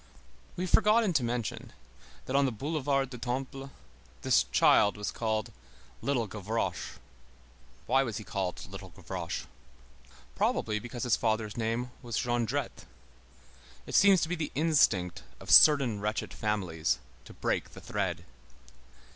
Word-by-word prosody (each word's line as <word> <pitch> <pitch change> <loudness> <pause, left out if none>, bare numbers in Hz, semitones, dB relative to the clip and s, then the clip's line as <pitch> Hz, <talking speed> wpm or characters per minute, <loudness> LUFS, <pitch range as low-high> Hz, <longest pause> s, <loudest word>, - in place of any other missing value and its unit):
We 180 - -3
have 185 - -3
forgotten 215 -2 +4
to 140 - +2
mention, 120 -1 -3 0.5
that 130 - -3
on 140 0 +4
the 130 - 0
Boulevard 135 +1 -1
du 125 - -8
Temple 135 +2 -4 0.5
this 65 - +4
child 65 +11 +4
was 105 - -3
called 110 -2 -2 0.5
Little 130 -5 0
Gavroche. 105 +2 -3 0.9
Why 135 - +3
was 115 -5 -3
he 110 - -6
called 95 -3 -4
Little - - -9
Gavroche? - - -6 0.9
Probably 105 - 0
because 120 +1 -6
his 125 -3 +3
father's 110 -2 -1
name 115 +2 -2
was 120 -4 -4
Jondrette. 120 -3 -2 1.0
It - - -9
seems 195 -3 +6
to 160 - -1
be - - -1
the 160 -2 -4
instinct 140 - +2 0.2
of - - -5
certain 135 -8 +7
wretched 105 +1 -3
families 95 -7 -1 0.3
to - - -12
break - - -2
the - - -10
thread. - - -3
120 Hz, 140 wpm, -30 LUFS, 105-140 Hz, 1.0 s, certain